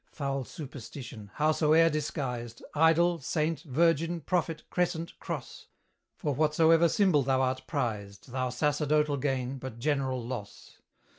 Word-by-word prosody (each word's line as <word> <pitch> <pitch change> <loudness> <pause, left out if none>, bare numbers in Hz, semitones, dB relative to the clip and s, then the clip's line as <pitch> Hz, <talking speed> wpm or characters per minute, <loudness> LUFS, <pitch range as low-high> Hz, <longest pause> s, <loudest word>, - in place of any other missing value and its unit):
Foul 140 -2 -2
Superstition! 130 - -9
howsoe'er 155 +1 +4
disguised, 130 -6 -3
Idol, 165 +2 +4
saint, 155 +1 -1
virgin, 165 +3 +1
prophet, 165 0 -1
crescent, 170 -2 -1
cross, - - -6 0.5
For 145 - -1
whatsoever 160 +3 +4
symbol 190 -9 +3
thou 130 0 +2
art 130 0 0
prized, 105 -6 -3
Thou 130 0 -1
sacerdotal 150 +2 +1
gain, 135 -1 -2
but 130 -3 -7
general 130 -2 -1
loss! 120 -5 -8
145 Hz, 120 wpm, -29 LUFS, 130-160 Hz, 0.5 s, howsoe'er